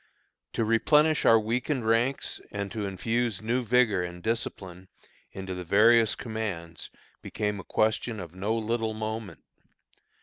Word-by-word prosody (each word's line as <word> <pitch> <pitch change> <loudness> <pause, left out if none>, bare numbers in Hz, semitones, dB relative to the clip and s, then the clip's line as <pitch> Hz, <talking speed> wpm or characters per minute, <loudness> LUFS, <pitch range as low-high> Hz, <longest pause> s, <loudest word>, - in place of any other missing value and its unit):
To 115 - 0
replenish 150 +8 +3
our 115 - +7
weakened 120 +3 -1
ranks 115 +5 0
and 100 -1 -4
to 105 -4 -3
infuse 115 +3 -1
new 120 +4 -1
vigor 115 -5 +3
and 90 0 -7
discipline 95 -5 -4 0.4
into 95 -1 -6
the 90 0 -5
various 110 +5 +5
commands, 100 -8 -5 0.3
became 105 -1 -3
a - - -7
question 110 +1 0
of 85 -3 -8
no 100 +5 -1
little 110 0 -1
moment. 110 -1 -5
110 Hz, 135 wpm, -27 LUFS, 100-115 Hz, 0.4 s, our